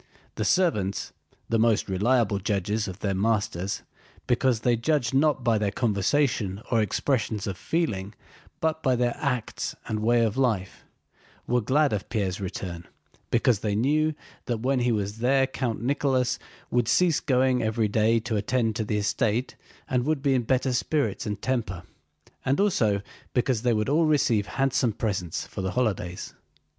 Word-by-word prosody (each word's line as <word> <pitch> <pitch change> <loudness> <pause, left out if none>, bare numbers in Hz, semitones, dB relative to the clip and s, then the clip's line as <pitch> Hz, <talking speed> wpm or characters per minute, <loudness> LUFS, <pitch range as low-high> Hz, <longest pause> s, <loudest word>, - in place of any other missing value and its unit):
The - - -3
servants—the 115 - -1
most 115 -1 +3
reliable 105 +1 +2
judges 105 +1 -1
of 95 +1 -8
their 100 -2 0
masters 100 -2 -1 0.4
because 125 -1 +2
they 120 0 +3
judge 130 0 0
not 140 -1 +2
by 115 -3 +2
their 105 -1 +1
conversation 105 -1 0
or 115 -2 +4
expressions 110 -1 -1
of 100 - -3
feeling 105 - -2 0.4
but 160 0 0
by 130 -4 +2
their 120 0 0
acts 125 -6 -2
and 110 - -2
way 115 +2 +3
of 110 +2 -2
life—were 120 +1 -3
glad 140 +5 +2
of 105 0 -3
Pierre's 100 -4 -1
return 90 -2 -5 0.4
because 120 -2 +2
they 105 -1 -1
knew 155 +7 +2 0.3
that 120 -3 -2
when 130 +1 +1
he 120 0 +2
was 105 0 -2
there 135 +3 +3
Count 125 -4 -3
Nicholas 130 -2 +1 0.3
would 120 -2 +2
cease 175 +1 +3
going 130 -1 +2
every 110 0 +1
day 110 +2 +3
to 115 0 -3
attend 110 +1 0
to 110 - 0
the 105 0 -1
estate, 110 +3 0 0.3
and 125 -1 +1
would 150 0 -1
be 140 -2 +3
in 130 - +2
better 130 +2 +1
spirits 120 -4 0
and 105 -1 -3
temper, 110 -9 -2 0.6
and 135 +2 +1
also 110 - +2 0.3
because 125 -2 +1
they 125 0 +2
would 105 -1 0
all 155 +4 +3
receive 120 -9 +2
handsome 135 -4 +1
presents 95 -7 -2
for - - -6
the 95 -1 -2
holidays. 95 -8 -2
115 Hz, 160 wpm, -26 LUFS, 105-130 Hz, 0.6 s, or